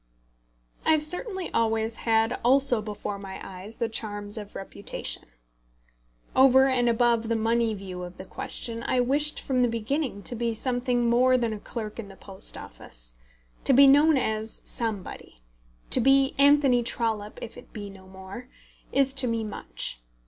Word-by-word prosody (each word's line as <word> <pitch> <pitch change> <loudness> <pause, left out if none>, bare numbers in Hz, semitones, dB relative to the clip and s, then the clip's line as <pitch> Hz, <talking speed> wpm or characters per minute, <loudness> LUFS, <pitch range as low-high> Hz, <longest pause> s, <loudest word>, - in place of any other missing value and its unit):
I 315 - +4
have 305 -1 +2
certainly 365 +3 0
always 225 0 0
had 225 0 +1
also 255 -2 +5
before 210 -1 -5
my 195 -1 -8
eyes 195 +4 -10
the 230 - 0
charms 205 -2 -1
of 210 -2 -4
reputation. 195 +1 -6 1.1
Over 265 0 +6
and 245 -2 +2
above 235 -1 +2
the 230 - +1
money 230 +1 +1
view 190 -2 -7
of 180 0 -8
the 185 - -8
question, 230 +4 -5
I 250 - 0
wished 290 +5 +2
from 260 -2 -1
the 245 - +4
beginning 230 0 -2
to - - -3
be 230 0 -1
something 245 0 0
more 255 +2 +4
than 235 -3 -1
a 210 - -6
clerk 215 0 -6
in 220 - -6
the 195 - -12
Post 190 0 -5
Office. - - -9 0.5
To 275 - +3
be 275 +2 +8
known 290 +2 +6
as 220 -2 -2
somebody, 220 - -5 0.6
to - - +4
be 270 +2 +4
Anthony 280 -3 +5
Trollope 220 -3 -2
if 230 0 -8
it - - -14
be 205 -2 -7
no 190 -1 -15
more, 190 +6 -10 0.4
is 275 -1 +2
to 265 -2 +2
me 230 -1 -1
much. - - -5
230 Hz, 165 wpm, -26 LUFS, 210-255 Hz, 1.1 s, be